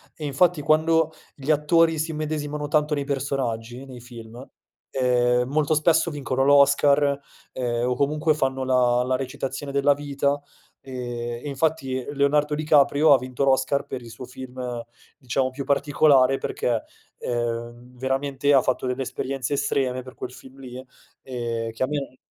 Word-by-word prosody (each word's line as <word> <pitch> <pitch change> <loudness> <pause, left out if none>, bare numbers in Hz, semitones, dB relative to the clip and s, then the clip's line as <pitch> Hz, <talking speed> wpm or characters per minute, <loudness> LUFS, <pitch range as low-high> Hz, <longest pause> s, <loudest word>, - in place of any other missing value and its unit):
E 155 - -6
infatti, 155 +3 +2
quando 160 +1 +3 0.2
gli 145 +2 -1
attori 160 +2 +3
si 160 +1 -1
immedesimano 150 -1 -3
tanto 150 0 +2
nei 140 - -2
personaggi, 130 -3 -3
nei 130 -2 -10
film, 120 0 -11 0.5
ehm, 125 -1 +2
molto 150 +2 +1
spesso 165 +2 +3
vincono 135 -3 -1
l'Oscar, 140 0 +4 0.3
ehm, 120 -1 -1
o 125 - +1
comunque 150 +3 +1
fanno 135 -2 -1
la 125 -1 +3
la 130 0 +1
recitazione 135 +2 -4
della 140 +1 +3
vita. 140 0 -1 0.4
Ehm, 120 -2 -5
e - - -3
infatti 135 -3 -1
Leonardo 145 +1 +2
Di 155 - -3
Caprio 150 0 +5
ha 130 - +5
vinto 130 +1 -3
l'Oscar 135 +1 +2
per 130 -2 -6
il 115 - -11
suo 120 +3 -9
film, 125 -2 -6 0.3
diciamo 130 -1 -1
più 135 +1 -6
particolare, 140 -2 +3
perché, 115 -3 -1 0.4
ehm, 120 +1 -4
veramente 135 +2 0
ha 135 - +6
fatto 130 0 -1
delle 125 +1 -2
esperienze 135 +1 -3
estreme 135 -2 0
per 130 0 -12
quel 125 - -6
film 130 +1 -14
lì 130 0 -9 0.4
e 115 -3 -4
che - - -1
a - - +1
me 140 -3 -4
135 Hz, 155 wpm, -24 LUFS, 125-145 Hz, 0.5 s, ha